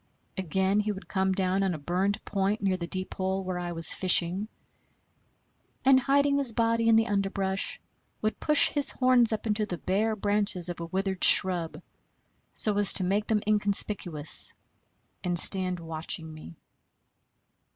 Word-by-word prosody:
Again 190 +2 -2
he 210 0 -2
would 195 -1 -10
come 190 -1 -2
down 190 0 -1
on 190 -3 -2
a - - -7
burned 185 +7 -3
point 200 +2 -2
near 195 -2 -1
the 170 -2 -7
deep 185 +1 -6
hole 190 0 -4
where 185 -1 -5
I 175 -1 -6
was 165 -1 -1
fishing, 185 +2 +3 1.4
and, 265 0 +5
hiding 280 +2 0
his 270 -4 +3
body 230 0 0
in 225 - +4
the 225 0 +2
underbrush, 195 - -3 0.4
would 215 0 -4
push 300 -1 +5
his 290 -1 +3
horns 255 -3 +2
up 220 - -4
into 210 -1 -2
the 175 - -6
bare 210 +6 -2
branches 205 -4 -3
of 175 - -7
a 170 - -7
withered 190 +1 -4
shrub, 170 -3 +4 0.7
so 210 -2 -1
as 205 - +6
to 190 - +4
make 200 +3 -2
them 215 -2 -1
inconspicuous, 200 -6 0 0.7
and 175 -1 -3
stand 185 0 +5
watching 160 0 -6
me. 85 - -13
195 Hz, 160 wpm, -26 LUFS, 180-215 Hz, 1.4 s, as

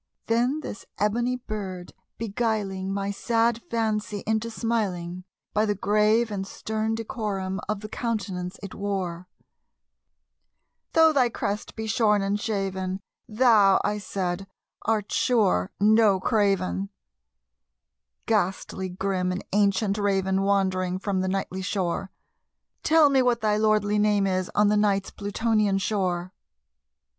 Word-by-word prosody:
Then 245 +6 +1
this 210 - -8
ebony 235 +4 +1
bird 200 -7 -6 0.2
beguiling 205 -4 -2
my 200 0 -2
sad 230 +2 +1
fancy 215 -3 -1
into 220 +1 0
smiling, 185 -7 -2 0.3
By 215 +1 +2
the 205 - +1
grave 215 +3 +2
and 195 -1 -3
stern 220 +2 -2
decorum 205 -4 -3
of 210 -1 -1
the 215 - -6
countenance 200 -5 -3
it 195 - -7
wore, 185 -3 -3 1.7
"Though 320 -1 +6
thy 255 -4 +3
crest 205 -2 -4
be 220 - -4
shorn 215 -2 +2
and 200 +1 0
shaven, 190 -3 -2 0.3
thou," 215 -4 +5
I 210 0 0
said, 195 -1 -3 0.3
"art 215 -2 -1
sure 200 - +2
no 210 -1 +5
craven, 195 -2 +1 1.4
Ghastly 190 +1 -1
grim 185 0 -1
and 180 - -4
ancient 200 0 +2
Raven 195 -1 +1
wandering 185 -2 +1
from 190 -1 -1
the 185 - -1
Nightly 190 -1 -2
shore 185 -1 -2 0.7
Tell 310 -2 +5
me 265 -1 +4
what 245 -2 +2
thy 210 -1 +2
lordly 210 -1 +2
name 205 -1 +3
is 185 -1 0
on 210 0 +4
the 210 - +3
Night's 200 -2 +1
Plutonian 210 -1 0
shore!" 185 -2 -1
205 Hz, 125 wpm, -26 LUFS, 190-220 Hz, 1.7 s, Though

